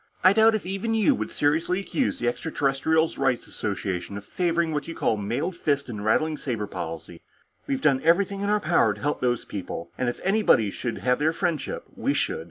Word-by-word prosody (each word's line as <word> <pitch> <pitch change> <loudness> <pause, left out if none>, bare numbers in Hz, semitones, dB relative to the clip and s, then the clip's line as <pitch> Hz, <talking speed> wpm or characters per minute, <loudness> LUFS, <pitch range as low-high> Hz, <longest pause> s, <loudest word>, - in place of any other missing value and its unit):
"I 185 +2 +7
doubt 220 +1 +5
if 210 - -3
even 195 +5 -2
you 225 +6 +4
would - - -3
seriously 160 +5 +1
accuse 250 +6 -1
the 120 - -2
Extraterrestrials' 160 +4 0
Rights 135 -3 +1
Association 100 -1 -3
of 100 - -9
favoring 170 -2 0
what 145 -1 -2
you 165 - -6
call - - +1
a 105 - -3
mailed 120 - -2
fist 140 -5 -1
and 105 -3 -5
rattling 155 +8 +1
saber 115 -8 -3
policy. 85 -2 -7 0.5
We've 135 -1 -1
done 135 -4 +3
everything 195 +5 +2
in 200 - -1
our 210 0 +3
power 110 - +2
to - - -13
help 145 +1 -1
these 120 -2 0
people, 95 -4 -6
and 125 - +1
if 120 - -5
anybody 190 - +3
should 120 +2 -4
have 125 0 +1
their 155 +2 +2
friendship, 165 -3 -2
we - - 0
should. - - 0
145 Hz, 205 wpm, -25 LUFS, 115-180 Hz, 0.5 s, I